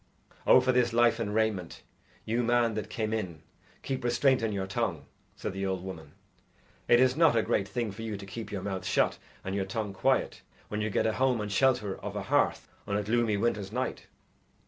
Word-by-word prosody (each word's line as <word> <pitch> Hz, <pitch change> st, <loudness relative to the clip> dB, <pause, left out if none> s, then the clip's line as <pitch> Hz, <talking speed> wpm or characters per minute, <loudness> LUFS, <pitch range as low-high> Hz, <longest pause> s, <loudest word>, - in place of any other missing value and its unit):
"Oh, -, -, +8 dB
for 130 Hz, +1 st, +2 dB
this 125 Hz, -2 st, +2 dB
life 120 Hz, -1 st, +4 dB
and 105 Hz, -3 st, -2 dB
raiment, 110 Hz, -6 st, -1 dB, 0.4 s
you 115 Hz, +2 st, 0 dB
man 120 Hz, -1 st, +2 dB
that 110 Hz, 0 st, -4 dB
came 110 Hz, -1 st, -2 dB
in, 90 Hz, -8 st, -4 dB, 0.4 s
keep 130 Hz, -1 st, -3 dB
restraint 125 Hz, +2 st, +3 dB
on 115 Hz, -1 st, 0 dB
your 100 Hz, -2 st, -2 dB
tongue!" 95 Hz, -, -2 dB, 0.3 s
said -, -, -5 dB
the 95 Hz, 0 st, -4 dB
old 95 Hz, -1 st, -2 dB
woman. 95 Hz, -4 st, -8 dB, 0.7 s
"It 120 Hz, -, +6 dB
is 130 Hz, 0 st, +4 dB
not 160 Hz, -5 st, +5 dB
a 115 Hz, -, +3 dB
great 100 Hz, -, 0 dB
thing 115 Hz, 0 st, -2 dB
for 110 Hz, -, -9 dB
you 110 Hz, -2 st, -4 dB
to 100 Hz, -, -9 dB
keep 110 Hz, +3 st, -7 dB
your 100 Hz, -3 st, -4 dB
mouth 95 Hz, -2 st, -3 dB
shut -, -, +1 dB, 0.3 s
and 95 Hz, -, -3 dB
your 100 Hz, -1 st, -1 dB
tongue 105 Hz, +1 st, -3 dB
quiet 95 Hz, -, +1 dB, 0.3 s
when 105 Hz, 0 st, -2 dB
you 110 Hz, -, -1 dB
get -, -, +1 dB
a 110 Hz, -, +2 dB
home 130 Hz, -1 st, +2 dB
and 105 Hz, -1 st, -3 dB
shelter 115 Hz, -2 st, +2 dB
of -, -, -6 dB
a -, -, -3 dB
hearth -, -, +1 dB, 0.2 s
on 100 Hz, -, 0 dB
a 105 Hz, -, -1 dB
gloomy 110 Hz, 0 st, +1 dB
winter's 105 Hz, -2 st, -1 dB
night." 125 Hz, +2 st, -3 dB
110 Hz, 215 wpm, -29 LUFS, 100-120 Hz, 0.7 s, Oh